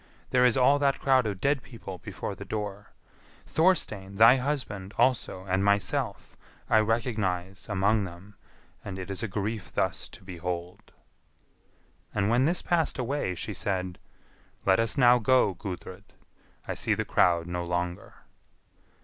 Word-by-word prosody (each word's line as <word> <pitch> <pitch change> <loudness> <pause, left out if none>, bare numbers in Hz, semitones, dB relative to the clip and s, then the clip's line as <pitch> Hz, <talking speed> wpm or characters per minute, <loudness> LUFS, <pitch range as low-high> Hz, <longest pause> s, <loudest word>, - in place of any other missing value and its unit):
"There 125 0 +4
is 125 +1 +4
all 140 +3 +5
that 140 -1 +2
crowd 130 -4 +3
of 100 -3 -4
dead 140 +2 +1
people 105 -7 -9
before - - -6
the - - -8
door; 105 -1 -5 0.6
Thorstein, 110 - +1
thy 115 +5 +7
husband, 125 -8 -3
also, 115 -7 +1
and 95 0 0
myself, 100 0 0 0.4
I 110 - +6
recognise 105 -5 -1
among 100 +1 +2
them, 95 +3 -11 0.5
and 95 -2 -6
it 95 +1 -6
is 95 - -3
a 115 - -1
grief 105 +2 -4
thus - - -1
to - - -14
behold." 90 -1 -6 1.2
And 105 0 +1
when 125 +3 +3
this 170 +4 0
passed 170 -3 +1
away, 130 -7 -2
she - - -4
said, 95 -2 -2 0.7
"Let 95 +1 +4
us 115 +5 0
now 125 -2 +6
go, 125 -3 +3
Gudrid; 90 +1 -8 0.6
I - - -2
see - - 0
the - - -2
crowd 85 -2 +3
no 90 0 -3
longer." 90 0 -3
105 Hz, 150 wpm, -28 LUFS, 95-125 Hz, 1.2 s, thy